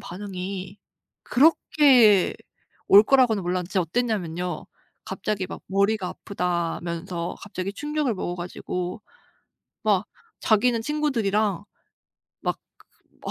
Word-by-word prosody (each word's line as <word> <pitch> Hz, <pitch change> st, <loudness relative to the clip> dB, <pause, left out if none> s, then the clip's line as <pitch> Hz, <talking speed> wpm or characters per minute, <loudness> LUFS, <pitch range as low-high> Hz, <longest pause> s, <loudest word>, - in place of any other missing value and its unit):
반응이 190 Hz, 0 st, -6 dB, 0.5 s
그렇게 255 Hz, -, +5 dB, 0.5 s
올 200 Hz, +1 st, +9 dB
거라고는 230 Hz, -5 st, +3 dB
몰랐는데 180 Hz, 0 st, -2 dB
진짜 190 Hz, -, +1 dB
어땠냐면요. 180 Hz, -4 st, -2 dB, 0.4 s
갑자기 195 Hz, 0 st, -3 dB
막 -, -, -8 dB
머리가 200 Hz, 0 st, +1 dB
아프다면서 170 Hz, -1 st, -3 dB
갑자기 195 Hz, -1 st, -5 dB
충격을 295 Hz, 0 st, -1 dB
먹어 175 Hz, -2 st, -3 dB
가지고 180 Hz, +2 st, -5 dB, 0.8 s
막 205 Hz, -2 st, +2 dB, 0.3 s
자기는 230 Hz, +2 st, +3 dB
친구들이랑 220 Hz, -, 0 dB, 0.8 s
막 -, -, -2 dB, 0.7 s
그 -, -, -3 dB
200 Hz, 255 characters per minute, -24 LUFS, 180-225 Hz, 0.8 s, 올